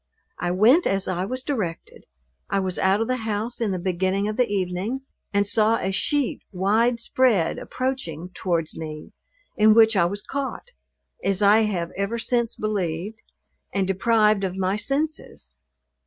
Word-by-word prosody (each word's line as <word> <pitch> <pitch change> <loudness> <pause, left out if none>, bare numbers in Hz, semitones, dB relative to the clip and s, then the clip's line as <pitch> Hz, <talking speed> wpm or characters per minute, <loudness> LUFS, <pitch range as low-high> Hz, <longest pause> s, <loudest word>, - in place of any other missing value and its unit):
I 175 - -1
went 220 - +4
as 195 0 0
I 185 0 -1
was 255 +5 -4
directed. 210 - -4 0.4
I 195 - +1
was 185 -1 -1
out 190 +3 +2
of 225 - 0
the 255 - 0
house 220 +1 -3
in 225 - +1
the 185 - -1
beginning 190 +2 -1
of 215 - -2
the 250 0 +2
evening, 195 +6 -2 0.3
and 200 0 +2
saw 220 +2 +3
a 190 - -2
sheet 265 +8 0
wide 220 +6 +2
spread 230 -8 +1
approaching 185 - -4
towards 170 -4 -2
me, 155 -1 -7 0.5
in 215 0 +6
which 225 -1 +6
I 180 -3 +4
was 200 +4 -3
caught 280 - -5 0.5
(as 195 +1 +1
I 205 +2 +6
have 175 -5 -2
ever 200 +4 -2
since 235 -1 0
believed) 205 0 -3 0.5
and 195 -2 +1
deprived 210 +1 +2
of 185 -1 -2
my 190 +1 0
senses! 285 +8 -3
205 Hz, 160 wpm, -24 LUFS, 185-230 Hz, 0.5 s, in